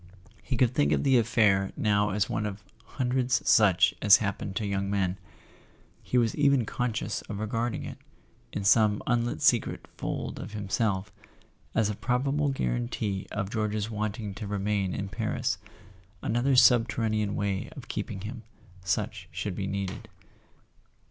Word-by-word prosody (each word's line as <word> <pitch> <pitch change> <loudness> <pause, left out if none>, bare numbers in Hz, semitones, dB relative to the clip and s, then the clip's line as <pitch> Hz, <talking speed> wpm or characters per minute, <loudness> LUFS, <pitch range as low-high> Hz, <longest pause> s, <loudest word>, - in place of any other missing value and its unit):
He 130 - -3
could 125 0 +3
think 70 -10 +2
of 70 - +1
the 130 -2 +5
affair 105 -4 +3
now 105 -1 +2
as 105 +1 0
one 105 - -1
of 105 0 -7 0.3
hundreds 130 -1 +1
such 100 -5 +5
as 105 -2 +8
happen 100 -1 -3
to 105 - -1
young 100 -1 -1
men; 95 -2 0 0.8
he 125 - -1
was 115 -2 +3
even 140 -4 +3
conscious 115 -1 -2
of 105 - -4
re¬ 110 +1 -3
garding 115 +1 -2
it, - - -8 0.5
in 100 - -3
some 105 +1 +4
unlit 120 0 0
secret - - +2
fold - - -4
of - - -7
himself, 105 -1 -1 0.6
as 110 -2 +3
a 105 - -1
prob¬ 125 +5 0
able 150 0 +1
guarantee 95 - -2
of 100 -1 -3
George's 110 -1 -1
wanting 105 -1 -3
to 105 +1 -6
remain 100 -1 -1
in 100 - -3
Paris, 105 +2 -2 0.6
another 120 +4 +2
subterranean 115 -4 +3
way 100 -2 -2
of - - -9
keeping 95 - -4
him, 110 +4 -6 0.4
should 90 - -8 0.4
such 90 +6 -4
be 95 +2 -3
needed. 100 +2 -4
105 Hz, 155 wpm, -28 LUFS, 100-115 Hz, 0.8 s, as